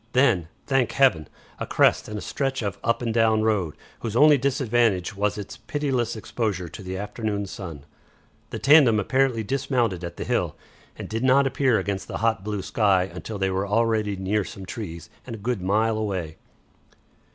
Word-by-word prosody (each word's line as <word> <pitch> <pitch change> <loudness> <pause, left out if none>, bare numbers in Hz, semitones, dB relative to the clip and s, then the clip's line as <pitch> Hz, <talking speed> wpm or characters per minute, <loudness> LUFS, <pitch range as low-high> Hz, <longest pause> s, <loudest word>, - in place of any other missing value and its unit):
Then, 120 - +3 0.2
thank 135 -4 +1
Heaven! 105 - +3 0.3
a - - -4
crest - - +3
and 105 - -5
a - - -5
stretch 135 -3 -2
of 100 -3 -3
up 115 +1 0
and 115 -2 -1
down 110 -1 +3
road, 100 -8 0 0.2
whose 115 -2 -4
only 150 +4 +7
disadvantage 120 -8 +1
was 105 +1 0
its 100 -2 -7
pitiless 130 -6 -2
exposure 105 -5 -3
to 85 - -10
the 95 0 -5
afternoon 105 0 -3
sun. 85 -7 -8 0.6
The - - -5
tandem 135 -7 +6
apparently 130 +1 +1
dismounted 120 -6 -1
at 85 - -6
the - - -3
hill, - - -1 0.4
and - - -7
did 115 +2 -3
not 135 +2 +5
appear 135 -3 +2
against 100 -1 -3
the - - -4
hot 110 -3 0
blue 105 -2 -3
sky 95 -4 +2
until 110 - -6
they 95 -1 0
were 95 +2 -1
already 110 -1 +1
near 100 +2 0
some 95 +2 -9
trees 85 -5 -7 0.2
and 115 - -5
a - - -8
good 115 -1 -2
mile 110 +4 +1
away. 95 -7 -3
110 Hz, 180 wpm, -24 LUFS, 95-120 Hz, 0.6 s, only